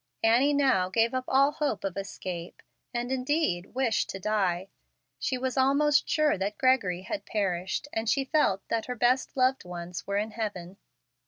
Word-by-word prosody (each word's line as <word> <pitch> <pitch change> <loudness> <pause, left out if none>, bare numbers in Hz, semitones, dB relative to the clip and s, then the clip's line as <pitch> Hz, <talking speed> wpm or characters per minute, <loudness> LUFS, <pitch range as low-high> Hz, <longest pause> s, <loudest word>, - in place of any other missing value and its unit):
Annie 245 +6 +4
now 260 -11 +3
gave 225 +5 +2
up 255 0 -2
all 275 +2 +4
hope 290 -8 -2
of 195 -2 -3
escape, 185 -3 -6 0.3
and 240 +1 -3
indeed 255 - -1
wished 255 -4 +1
to 190 - -5
die. 190 -2 0 0.5
She 255 - -1
was 260 +1 -3
almost 285 +3 +3
sure 305 - +2
that 200 +2 -2
Gregory 205 -9 +2
had 300 +10 -4
perished, 190 +4 -2
and 225 0 -1
she 275 0 +1
felt 265 -10 +1
that 230 +1 -1
her 250 - -3
best 250 +3 +1
loved 260 +1 +2
ones 175 0 -7
were 200 0 0
in 215 +2 -1
heaven. 195 -5 -5
225 Hz, 170 wpm, -28 LUFS, 190-265 Hz, 0.5 s, Annie